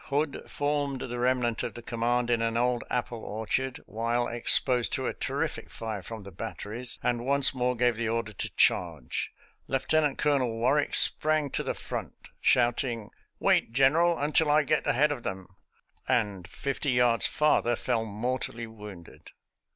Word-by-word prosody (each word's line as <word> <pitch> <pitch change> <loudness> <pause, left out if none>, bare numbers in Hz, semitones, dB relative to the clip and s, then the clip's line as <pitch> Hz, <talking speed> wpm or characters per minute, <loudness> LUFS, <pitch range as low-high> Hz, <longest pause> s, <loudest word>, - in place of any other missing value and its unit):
Hood 145 +1 -2
formed 145 -2 -2
the 120 -1 -5
remnant 125 -2 +1
of - - -5
the 120 - -9
command 120 +1 0
in 115 -1 +2
an 115 0 0
old 125 0 +1
apple 120 -1 -2
orchard 110 +5 -2
while 115 +2 -1
exposed 120 +1 +3
to - - -1
a - - -1
terrific - - -2
fire 110 -3 -5
from 110 +3 -8
the 100 - -10
batteries, 115 +5 -3
and 120 -1 0
once 140 +1 +4
more 125 -1 0
gave 120 -1 +1
the 115 -1 -1
order 115 -1 -2
to - - -3
charge. - - +1 0.4
Lieutenant 145 +2 +1
Colonel 140 -5 +1
Warwick 135 +6 +1
sprang 155 -2 +4
to - - -1
the - - -3
front, - - -6 0.2
shouting, 120 -2 +1
" - - -46
Wait, 115 - +2
General, 160 +6 +4
until 150 +2 +2
I 150 +1 +4
get 140 - 0
ahead 150 +4 +3
of 140 -5 -4
them," 95 -3 -5 0.6
and 105 -8 0
fifty 140 +7 -3
yards 125 -2 +3
farther 150 -5 +2
fell 115 -1 -1
mortally 115 +2 -3
wounded. 105 -6 -12
120 Hz, 160 wpm, -28 LUFS, 115-135 Hz, 0.6 s, once